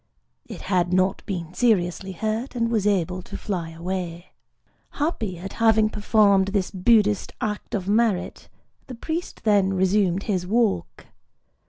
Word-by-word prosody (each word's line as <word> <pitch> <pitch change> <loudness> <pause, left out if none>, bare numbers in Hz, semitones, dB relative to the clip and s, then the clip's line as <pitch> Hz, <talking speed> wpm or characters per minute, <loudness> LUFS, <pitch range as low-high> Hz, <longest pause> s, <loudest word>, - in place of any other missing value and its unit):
It - - -8
had 180 -2 0
not 185 +1 +1
been 175 -4 -4
seriously 190 -4 +1
hurt, 220 +7 -3
and 230 -1 0
was 215 -3 +1
able 185 -2 0
to - - -8
fly 180 -6 -4
away. 170 +1 -5 0.6
Happy 230 - -2
at 190 +3 -7
having 220 -1 +4
performed 205 -2 +3
this 195 -2 -1
Buddhist 210 +1 +2
act 210 -2 -3
of 190 -2 -3
merit, 210 -2 0 0.4
the 255 - -7
priest 320 +8 -5
then 200 -3 +3
resumed 190 0 +2
his 185 -5 -2
walk. 220 0 0
195 Hz, 140 wpm, -24 LUFS, 185-220 Hz, 0.6 s, having